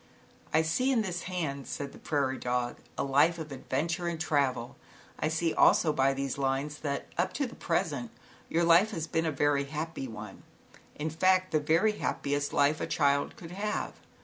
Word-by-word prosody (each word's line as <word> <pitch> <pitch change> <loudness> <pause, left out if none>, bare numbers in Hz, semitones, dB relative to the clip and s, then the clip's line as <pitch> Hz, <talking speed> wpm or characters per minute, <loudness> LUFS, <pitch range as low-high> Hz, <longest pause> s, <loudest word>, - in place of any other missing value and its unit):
"I 160 +1 +4
see 250 +12 +1
in 235 -4 +2
this 180 -3 -4
hand," 150 -7 -3
said 140 -1 -4
the - - -13
prairie 140 -3 -1
dog, 125 0 -1 0.2
"A - - 0
life 145 +5 +3
of 155 -3 -7
adventure 165 +6 -2
and 170 -2 -2
travel. 140 -6 0 0.4
I - - +1
see 160 +1 0
also 155 -3 +5
by 135 -1 +3
these 135 0 -3
lines, 140 +2 -1
that 140 -2 -3
up 185 +2 +1
to 280 - 0
the 245 - -7
present, 145 -8 -1 0.4
your 170 +1 +2
life 170 +5 +6
has 165 -8 -3
been 160 +1 0
a - - +1
very 145 0 +2
happy 155 -1 -4
one, 105 -3 -9 0.5
in 155 +1 -3
fact, 185 +3 +3
the 155 - +3
very 165 +8 +3
happiest 145 0 -1
life 145 +2 +2
a - - -1
child 140 0 +1
could 165 -1 -10
have. 205 +3 -2
155 Hz, 185 wpm, -30 LUFS, 140-170 Hz, 0.5 s, life